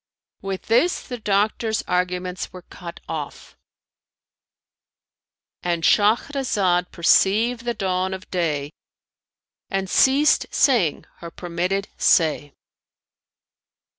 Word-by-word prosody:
With 195 -1 -5
this 250 +11 +2
the 245 -2 -6
doctor's 215 +2 0
arguments 180 0 -2
were 185 -1 -11
cut 170 0 -10
off,—And 165 +2 -10
Shahrazad 205 -5 +2
perceived 225 +7 +2
the 240 -1 -1
dawn 185 -2 -1
of 185 - -12
day 150 -5 -1 1.0
and 195 -1 -2
ceased 275 +9 +3
saying 230 - +2
her 170 - -9
permitted 180 +4 -3
say. 155 -4 +2
190 Hz, 85 wpm, -22 LUFS, 175-220 Hz, 1.0 s, ceased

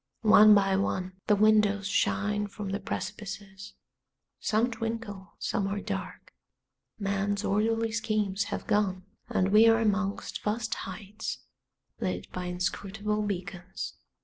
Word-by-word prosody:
One 215 -1 +8
by 195 -1 +3
one 185 -1 -2
the 210 - +5
windows 205 -1 +4
shine 205 +1 +1
from 205 0 -6
the 200 +1 -2
precipices; 195 -1 -6 0.7
some 225 +3 +1
twinkle, 225 -4 -5
some 195 - -1
are 200 +1 -2
dark; - - -6 0.6
man's 200 0 -1
orderly 225 +3 +1
schemes 215 -3 0
have - - -4
gone, 190 -3 +1 0.2
and 190 0 +1
we 215 +2 +7
are 225 0 +6
amongst 205 -2 -1
vast 220 +1 -1
heights 205 +3 -6 0.6
lit - - -3
by 180 0 -4
inscrutable 200 +4 -2
beacons. 185 - -4
205 Hz, 120 wpm, -29 LUFS, 195-215 Hz, 0.7 s, One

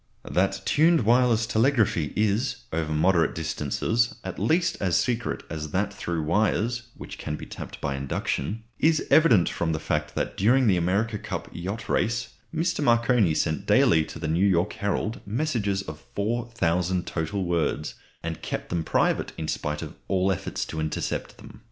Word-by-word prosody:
That 95 +2 0
tuned 160 +2 +4
wireless 120 -1 +4
telegraphy 110 - +2
is, 110 +4 0
over 80 -1 -1
moderate 80 +1 +3
distances, 80 - 0
at - - -6
least 170 +2 +2
as 90 -3 +2
secret 120 +6 -1
as 75 -1 -5
that 100 +4 -1
through 85 -4 -3
wires 110 +7 +1
(which - - -9
can 75 - -3
be - - -8
tapped - - -8
by 70 - -2
induction) 70 +8 -2 0.2
is 160 0 +3
evident 125 - +6
from 80 -1 -1
the 80 - -2
fact - - -2
that - - -2
during 125 +6 +4
the 100 -5 +4
America 100 +5 0
Cup - - -5
Yacht 95 +7 -5
Races 120 +2 0 0.2
Mr. 165 -1 0
Marconi 115 - +3
sent 80 -3 -1
daily 80 -1 +5
to - - -9
the 80 - -4
New 85 +4 +1
York 95 +1 +2
Herald 100 +2 -2
messages 105 -5 -1
of 75 -4 -8 0.2
4000 100 -6 0
total 85 +4 -2
words, 85 -3 -1 0.3
and 85 -1 -4
kept - - -4
them 85 -1 -1
private - - +1
in 80 - -4
spite 75 0 -2
of - - -7
all 95 0 +2
efforts 95 - -3
to 80 - -5
intercept 80 0 -3
them. - - -13
100 Hz, 165 wpm, -26 LUFS, 80-115 Hz, 0.3 s, evident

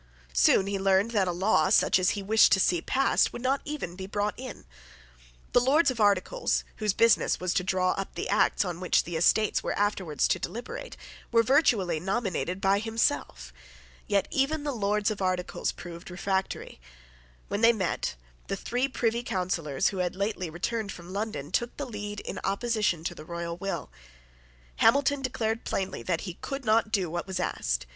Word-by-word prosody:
Soon - - +4
he 200 0 -2
learned 195 +3 +3
that 200 -5 +2
a - - +1
law, 175 -3 +2
such - - +4
as 185 - +3
he 200 - -4
wished 220 +3 +5
to 190 - +4
see 175 -3 +2
passed, 270 +8 +2
would 240 - -8
not 270 +2 +1
even 295 - -5
be 190 0 -7
brought 205 +1 -1
in. 255 0 -9 0.9
The - - +6
Lords 275 +4 +4
of 245 - -7
Articles, 205 - +2
whose 215 -2 +1
business 230 +3 +3
was 180 -1 -1
to 180 - +1
draw 185 0 +1
up 195 - -4
the - - -3
acts - - +2
on 175 -2 -4
which 180 -2 +2
the 175 - -6
Estates 205 +6 +3
were - - -3
afterwards 195 -7 0
to - - +1
deliberate, 240 +2 -6 0.3
were 230 -1 +5
virtually 225 - +3
nominated 190 -1 -2
by 195 +1 +3
himself. 205 - -1 0.5
Yet 200 -1 +1
even 290 +3 0
the 295 - -1
Lords 210 -2 0
of 205 - -5
Articles 185 -1 -1
proved 170 +1 -10
refractory. 190 - -3 0.7
When 205 - -2
they 230 0 +7
met, 190 - -2 0.3
the - - -1
three 245 +7 -1
Privy 235 -3 0
Councillors 180 - -1
who 195 - -6
had 180 -1 -1
lately 195 -3 -2
returned 200 +6 -3
from 175 +1 -10
London 200 -8 -4
took 240 +5 -1
the 285 - -3
lead 205 -3 -6
in - - -6
opposition 210 -4 0
to 175 - -2
the 160 - -10
royal 170 +1 -5
will. 195 - -4 0.9
Hamilton 280 0 +3
declared 230 -3 -2
plainly 190 0 -3
that 170 -3 -1
he 180 -3 -7
could 275 -1 -5
not 220 0 +3
do 190 -5 +1
what 175 +2 -3
was 190 -1 -3
asked. - - -1
200 Hz, 180 wpm, -28 LUFS, 180-230 Hz, 0.9 s, they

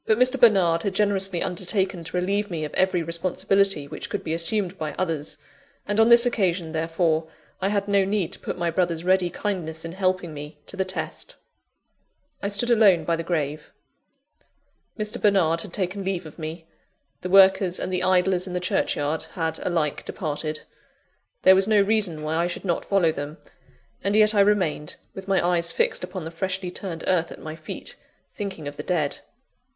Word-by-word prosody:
But 220 - +4
Mr. 255 +2 +3
Bernard 185 -7 +5
had 195 0 -2
generously 195 -3 +1
undertaken 185 0 -1
to 160 +3 -4
relieve 200 +3 0
me 160 -4 -3
of 150 - -8
every 185 -2 +2
responsibility 175 0 +1
which - - -6
could - - -3
be 160 - -2
assumed 180 +3 0
by 155 -1 -3
others; 160 -5 -1 0.5
and 205 +1 0
on 225 +1 +6
this 235 0 +8
occasion, 185 -8 0
therefore, 160 0 0 0.3
I 190 - +1
had 200 -1 0
no 200 -1 +3
need 195 -3 -1
to - - -6
put - - -5
my 170 -1 0
brother's 170 -1 0
ready 185 0 +3
kindness 165 -4 -4
in 165 - -5
helping 185 -2 -1
me 150 +1 -8
to - - -9
the 190 0 0
test. 185 - -4 1.1
I - - -1
stood 205 +4 +1
alone 200 -8 +5
by 170 - +1
the 165 - -3
grave. 155 -3 -3 1.3
Mr. 215 -1 -3
Bernard 175 -6 +3
had - - -9
taken 190 +2 -2
leave 185 -3 -2
of 155 +2 -12
me; 160 +1 -6 0.6
the 180 - -4
workers 190 -1 +5
and 185 - -3
the 180 - 0
idlers 185 0 +2
in 180 - -6
the 180 - 0
churchyard 155 -3 -1
had 160 -2 -2
alike 165 -5 -1
departed. 155 -1 -3 0.8
There 190 - +8
was 190 +1 +3
no 215 -1 +4
reason 200 -6 +1
why 155 +1 -1
I 170 +1 +2
should 175 - -6
not 175 -3 -1
follow 190 -5 +3
them; 145 0 -6 0.7
and 200 +2 +1
yet 215 0 +6
I 205 - +2
remained, 190 -7 +2 0.2
with 190 0 -9
my 190 -3 +2
eyes 170 -1 +1
fixed - - 0
upon 180 -1 -5
the 160 - -6
freshly 185 +1 -3
turned 175 -3 -6
earth 170 -3 +1
at - - -9
my 155 0 -7
feet, 155 -1 -7 0.4
thinking 190 -7 -5
of 145 +1 -7
the - - -3
dead. 155 -6 -1
180 Hz, 190 wpm, -24 LUFS, 165-195 Hz, 1.3 s, this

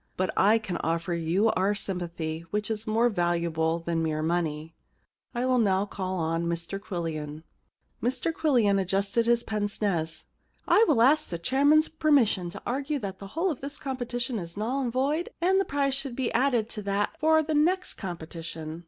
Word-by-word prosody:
* - - -42
But 185 0 0
I 210 +3 +5
can 205 -5 -4
offer 165 +2 -1
you 170 +7 +2
our 195 +3 +1
sympathy, 170 -4 -3
which 210 +1 -2
is 220 +1 -3
more 225 +3 +3
valuable 170 -4 0
than 165 0 -2
mere 155 -1 -1
money, 160 -1 -1 0.6
I 240 +1 0
will 255 -1 +3
now 195 -3 +2
call 190 -2 -4
upon 165 0 -1
Mr 170 +3 -3
Quillian.' 160 -6 -5 0.6
Mr 260 +7 0
Quillian 240 -12 +3
adjusted 200 +5 0
his 235 0 +3
pince 210 -1 -2
nez. 165 -6 -1 0.2
* - - -40
I 445 - +6
will 240 -7 +4
ask 290 +5 +4
the 170 - -3
chairman's 285 - +3
permission 270 - +2
to 200 +3 -9
argue 280 +4 -1
that 195 -6 -5
the 195 - -8
whole 360 +2 +2
of 290 - -6
this 285 +2 -5
competition 245 -3 -3
is 170 +1 -8
null 245 +6 -1
and 245 -3 -1
void, 285 +7 0
and 375 +3 +3
that 390 - 0
the - - -25
prize 280 -1 +1
should 275 -2 -2
be 255 -2 -1
added 240 -3 +2
to 215 - -6
that 200 +7 -1
for 315 0 +4
the 310 +1 -2
next 355 +5 +2
competition.' 165 -3 -6
205 Hz, 190 wpm, -27 LUFS, 170-265 Hz, 0.6 s, I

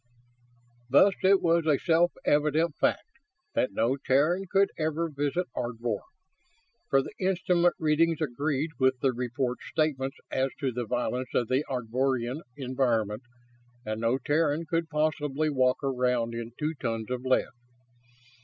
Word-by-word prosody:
Thus, 190 +9 +6
it 190 +1 +4
was 165 -1 +2
a 150 -3 +4
self 170 +2 +3
evident 150 +2 +2
fact - - +1 0.5
that 125 - +1
no 115 +7 +1
Terran 150 +8 +2
could 195 +1 +3
ever 160 +1 -1
visit 145 +5 -1
Ardvor; 120 -3 -2 0.9
for 135 0 +3
the - - -8
instrument 180 -2 +2
readings 160 +1 +2
agreed 150 +1 -1
with 130 -1 +3
the 135 -2 +2
report's 125 +1 -3
statements 140 -4 -1
as 130 +1 +1
to 135 -3 -1
the 120 -1 -4
violence 125 +1 -2
of 120 - +1
the 130 +3 +2
Ardvorian 130 +2 -1 0.2
environment, 125 -5 0 0.6
and 110 +1 -3
no 115 +3 +2
Terran 150 +3 0
could 165 0 -1
possibly 150 -1 0
walk 130 -2 +2
around 125 -3 0
in 115 0 -6
two 155 +1 -1
tons 115 -5 -4
of 125 -1 -2
lead. 130 0 +2
135 Hz, 140 wpm, -28 LUFS, 125-155 Hz, 0.9 s, Thus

